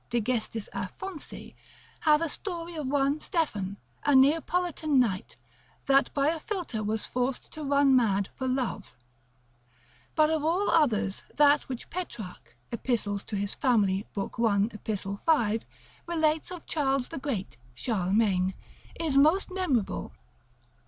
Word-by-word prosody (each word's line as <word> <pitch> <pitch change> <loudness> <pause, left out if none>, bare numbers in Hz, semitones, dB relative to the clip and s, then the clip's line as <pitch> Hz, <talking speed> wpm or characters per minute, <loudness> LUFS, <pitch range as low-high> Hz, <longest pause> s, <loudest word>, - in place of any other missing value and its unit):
de 240 0 +1
gest. 230 0 -1 0.2
Aphonsi, 325 - -6 0.5
hath 305 -1 +4
a - - +1
story 345 0 -4
of 305 -4 -4
one 280 +2 +1
Stephan, 205 - -2 0.3
a 290 -1 +4
Neapolitan 310 +1 +3
knight, 200 -7 0 0.5
that 275 0 +4
by 280 +1 +3
a 325 0 -1
philter 350 - -3
was 215 +1 -1
forced 250 +1 -2
to 310 - -6
run 280 -1 +4
mad 200 -5 +3
for 260 - -4
love. 255 -5 -2 1.2
But 310 0 +4
of 315 -2 0
all 350 +6 +2
others, 220 - +2
that 290 -1 +4
which 255 -3 -6
Petrarch, 240 - -6 0.2
epist. 235 -1 -1
famil. 205 0 0
lib. 200 +2 -4
1. 215 -1 +3
ep. 200 -2 -4
5, 230 -9 +2 0.4
relates 315 -2 +1
of 360 -3 -8
Charles 270 -4 0
the - - -5
Great 240 - -4 0.2
(Charlemagne) 190 - +1 0.4
is 320 -4 0
most 315 +8 +4
memorable. 315 - -1
265 Hz, 130 wpm, -28 LUFS, 215-310 Hz, 1.2 s, hath